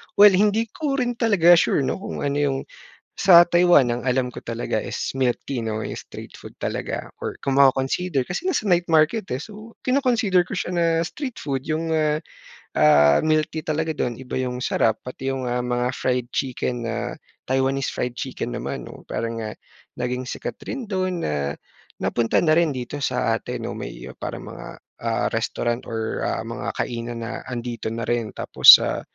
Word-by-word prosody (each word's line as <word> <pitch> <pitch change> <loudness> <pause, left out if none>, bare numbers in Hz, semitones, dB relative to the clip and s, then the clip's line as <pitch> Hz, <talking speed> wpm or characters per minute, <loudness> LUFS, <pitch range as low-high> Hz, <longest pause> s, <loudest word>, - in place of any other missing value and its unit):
Well, 205 0 +9
hindi 210 +3 +2
ko 295 -3 -2
rin 245 -3 -1
talaga 200 -7 +5
sure, 140 - +2
'no, 130 +7 -2
kung 195 - -5
ano 140 0 0
yung 140 -2 +1 0.6
sa 175 -2 +7
Taiwan 175 -7 +5
ang 120 +1 -2
alam 125 0 +1
ko 125 - -9
talaga 115 0 -3
is - - -4
milk 130 -2 +1
tea, 130 -4 -2
'no, 110 -1 -2
'yong - - -4
street - - -10
food - - -11
talaga - - -3 0.2
or - - -2
kung 135 - -1
maco-consider 135 +2 +2
kasi 180 - -3
nasa 220 - -1
night 175 -1 +3
market, 160 +7 +4
eh. 125 - -1
So, 215 +5 -10
kino-consider 240 -8 +3
ko - - -10
siya - - -3
na 170 - +2 0.2
street 255 - -6
food 135 -3 -2
yung 160 +1 -1
ah, 155 -1 +2 0.6
ah, 75 -1 +5
milk 155 -1 +3
tea 160 - -3
talaga 160 +1 -1
dun 120 -4 -2
iba 130 - -7
yung 125 -1 -3
sarap. 110 -3 +1
Pati 135 +1 -4
yung 130 -1 -3
mga, 125 0 -2 0.2
ah, - - -3
fried 125 -1 0
chicken 125 -2 -2
na 115 -1 -3 0.3
Taiwanese 135 +1 +1
fried 125 - -2
chicken 130 - -4
naman, - - -4
'no. - - -11
Parang 115 0 -3
nga 110 -1 -5 0.5
naging 125 +1 -2
sikat - - -5
rin 270 - -3
dun 185 -2 -1
na 70 -1 -1 0.5
napunta 115 -1 +1
na 155 - +4
rin 170 -1 +3
dito 130 +3 -5
sa 125 -4 0
atin, - - -6
no, - - -3
may - - -7
parang - - -5
mga, - - -9 0.4
ah, - - 0
restaurant 120 +1 -2
or, 110 -1 -3
ah, - - -1
mga - - -5
kainan 115 0 -4
na 115 - -5
andito 120 -1 -5
na 115 +1 -3
rin. 120 -2 -1
Tapos - - +9
sa - - -2
135 Hz, 185 wpm, -23 LUFS, 120-175 Hz, 0.6 s, Well